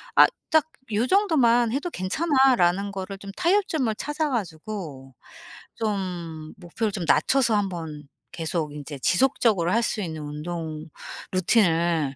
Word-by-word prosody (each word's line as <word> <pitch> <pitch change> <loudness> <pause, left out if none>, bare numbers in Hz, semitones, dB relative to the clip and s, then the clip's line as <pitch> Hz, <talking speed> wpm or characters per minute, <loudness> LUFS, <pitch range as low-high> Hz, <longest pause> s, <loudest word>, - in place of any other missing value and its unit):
아 - - +9 0.2
딱 315 -3 +4 0.3
'요정도만 245 - +3
해도 290 +7 -2
괜찮아.'라는 205 - +2
거를 195 0 -6
좀 200 0 -9
타협점을 330 - +1
찾아가지고 195 - -4 0.6
좀 175 -7 -4
목표를 195 +4 -3
좀 185 -4 -4
낮춰서 250 -5 +3
한번 165 -7 -3 0.3
계속 160 -2 -3
인제 145 -1 -8
지속적으로 190 - +2
할 230 - +3
수 220 - -1
있는 160 -4 -5
운동 155 +1 -5 0.5
루틴을 170 - +2
195 Hz, 260 characters per minute, -25 LUFS, 165-240 Hz, 0.6 s, 아